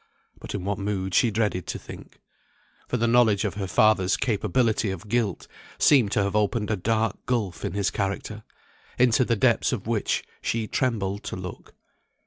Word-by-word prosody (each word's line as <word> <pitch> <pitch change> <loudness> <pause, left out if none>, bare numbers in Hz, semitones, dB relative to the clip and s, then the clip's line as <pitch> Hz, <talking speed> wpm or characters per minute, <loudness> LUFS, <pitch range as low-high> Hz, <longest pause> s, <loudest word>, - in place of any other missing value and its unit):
But - - -7
in 100 - -4
what 100 +1 -2
mood 95 -2 -2
she 120 - +4
dreaded 105 -5 -1
to - - -3
think. - - -12 0.7
For 125 - -1
the 115 - +1
knowledge 115 -4 +4
of - - -1
her 100 -1 -4
father's 100 -2 +3
capability 110 -1 +1
of 95 +2 -6
guilt 110 -4 -1 0.3
seemed 125 -9 +4
to 100 - +2
have 100 +1 -2
opened 105 +1 0
a - - +2
dark 110 +1 -1
gulf 110 -8 -1
in - - -3
his 100 -1 0
character, 100 +2 -3 0.6
into 125 0 +4
the 120 -1 +1
depths 115 +2 +2
of 120 -7 -3
which 110 -2 0 0.2
she 115 -1 -1
trembled 105 -6 -1
to - - -4
look. 90 0 -9
105 Hz, 175 wpm, -25 LUFS, 100-115 Hz, 0.7 s, she